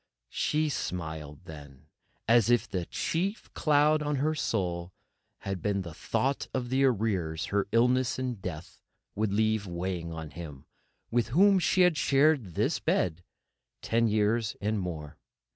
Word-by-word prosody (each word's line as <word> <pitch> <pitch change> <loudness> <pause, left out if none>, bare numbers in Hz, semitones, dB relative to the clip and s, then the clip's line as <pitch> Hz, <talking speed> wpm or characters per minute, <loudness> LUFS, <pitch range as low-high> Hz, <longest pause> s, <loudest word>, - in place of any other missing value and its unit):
She 155 +1 0
smiled 80 - -5
then, 70 -3 -11 0.4
as 115 -1 +5
if 120 -1 +3
the 90 -3 -3
chief 195 +6 -2
cloud 150 0 +3
on 150 0 -1
her 150 +3 +1
soul 90 - -2 0.5
had 95 -2 -4
been 100 -2 0
the 85 -3 -8
thought 130 - -1
of 125 -1 -2
the 135 +1 +3
arrears 95 -10 0
her 100 -1 +1
illness 125 +2 +2
and 125 -5 -3
death 90 -3 -7 0.3
would 105 -1 -1
leave 110 0 +1
weighing 85 -1 -3
on 80 -2 -7
him 75 -3 -9 0.5
with 120 -1 +1
whom 190 - +5
she 185 +1 +2
had 180 -3 +4
shared 135 - +2
this - - +1
bed 90 -1 0 0.6
ten 115 0 +2
years 110 +1 +1
and 105 +1 -1
more. 80 -4 -6
105 Hz, 145 wpm, -29 LUFS, 85-130 Hz, 0.6 s, as